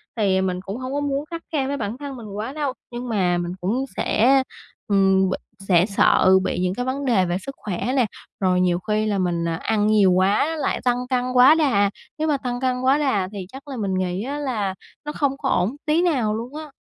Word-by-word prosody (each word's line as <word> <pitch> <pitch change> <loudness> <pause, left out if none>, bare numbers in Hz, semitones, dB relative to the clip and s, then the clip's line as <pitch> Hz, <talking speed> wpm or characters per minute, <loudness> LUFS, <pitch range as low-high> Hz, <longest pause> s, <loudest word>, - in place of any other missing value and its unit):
Thì, 200 -4 +2
à, - - +2
mình 185 -1 -2
cũng 195 +3 -6
hông 255 +1 -5
có 285 - 0
muốn 285 0 -2
khắt 335 +1 -7
khe 280 -4 0
với 285 +1 -2
bản 215 -1 -4
thân 280 -1 -7
mình 230 -4 -9
quá 225 +6 -4
đâu, 290 -3 -2 0.2
nhưng 240 +1 -5
mà 185 -5 +1
mình 175 0 -3
cũng 230 +9 0
sẽ, 260 +5 +3 0.4
ừm, 195 -1 +3
b - - 0 0.3
sẽ 185 -3 +3
sợ 200 -2 +3
bị 180 - -2
những 180 0 0
cái 245 +5 -3
vấn 270 +2 -2
đề 220 -8 +3
về 175 0 -1
sức 275 +8 -8
khỏe 210 +5 -3
nè. 255 -3 +3 0.3
Rồi 185 -2 +2
nhiều 175 -1 +2
khi 215 +3 -1
là 210 -2 0
mình, 175 -2 0
à, 165 - -1
ăn 210 -1 +1
nhiều 210 -3 +4
quá 195 - +2
lại 305 - -1
tăng 245 -1 +2
cân 250 -2 +1
quá 255 +4 +7
đà. 240 -11 +3 0.3
Nếu 315 +1 -1
mà 295 -2 +2
tăng 245 -2 -4
cân 255 -1 0
quá 265 +2 +4
đà 265 -11 +1
thì 200 -3 -6
chắc 275 +2 -11
là 270 -2 -6
mình 200 -4 -2
nghĩ 185 +1 -1
á, 280 +4 -4
là 220 -9 -2 0.3
nó 295 - -3
không 280 -2 -1
có 275 -2 -2
ổn 195 +9 +1
tí 310 +2 +2
nào 255 -12 +1
luôn 240 +5 -6
á. 305 -1 -7
230 Hz, 240 wpm, -22 LUFS, 190-275 Hz, 0.4 s, quá